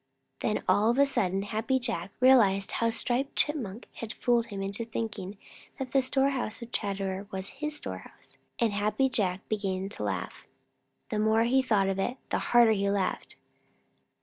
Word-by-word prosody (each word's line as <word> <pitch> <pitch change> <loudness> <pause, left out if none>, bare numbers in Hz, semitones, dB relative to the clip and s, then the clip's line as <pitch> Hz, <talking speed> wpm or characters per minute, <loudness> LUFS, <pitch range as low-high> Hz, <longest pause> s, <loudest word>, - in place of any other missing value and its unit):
Then 215 - -1
all 210 +2 +4
of 240 - +2
a 280 - +6
sudden 195 -8 0
Happy 220 +5 0
Jack 220 -8 -2
realized 220 -7 +5
how 230 - +1
Striped 250 +4 -1
Chipmunk 245 -8 -1
had 230 0 -6
fooled 240 -2 +1
him 195 -2 -5
into 200 +4 -3
thinking 215 -4 -5 0.4
that 265 -3 -5
the 270 - +4
storehouse 260 -3 0
of 235 - -11
Chatterer 195 -1 -2
was 190 -1 -5
his 300 0 -2
storehouse, - - -9 0.2
and 230 -3 +1
Happy 210 +6 +1
Jack 190 -6 -1
began 195 -2 -2
to 205 - -6
laugh. - - -4 0.6
The 215 - 0
more 220 +1 +3
he 260 +3 +3
thought 215 -7 +2
of 195 0 -1
it, 245 +7 -1
the - - +1
harder 240 -2 +6
he 200 -2 +1
laughed. 195 -2 -1
220 Hz, 170 wpm, -29 LUFS, 195-245 Hz, 0.6 s, a